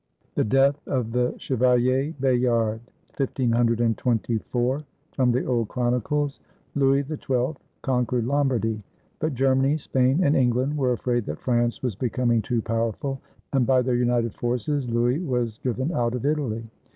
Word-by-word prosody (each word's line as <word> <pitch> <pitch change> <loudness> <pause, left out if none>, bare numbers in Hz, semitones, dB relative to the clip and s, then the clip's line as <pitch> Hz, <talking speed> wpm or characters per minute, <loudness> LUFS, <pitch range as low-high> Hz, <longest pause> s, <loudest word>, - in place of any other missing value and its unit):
THE - - +1
DEATH 135 +5 +3
OF 125 -4 -1
THE 125 +1 0
CHEVALIER 130 +3 +1
BAYARD 120 -4 +1 0.3
FROM 120 +2 0
THE 125 +2 0
OLD 120 -3 0
CHRONICLES 125 +5 -1 0.3
[Louis 140 0 +3
XII 135 -2 -1 0.3
conquered 125 -2 0
Lombardy; 125 -5 0 0.4
but 155 -3 -1
Germany, 135 +3 +2
Spain, 135 +1 +1
and 145 -1 +3
England 130 +3 +2
were 130 -4 +1
afraid 120 -1 -1
that 75 - -3
France 120 -1 0
was 125 -4 0
becoming 120 +1 0
too 115 +1 -1
powerful, 115 +4 -2 0.3
and 130 -4 +2
by 130 -1 +4
their 125 0 0
united 120 -2 +1
forces 125 +3 -1
Louis 120 +4 +1
was 125 -9 -2
driven 130 +5 -1
out 120 -3 0
of 125 - -4
Italy. 135 -7 -1
125 Hz, 135 wpm, -25 LUFS, 120-135 Hz, 0.4 s, by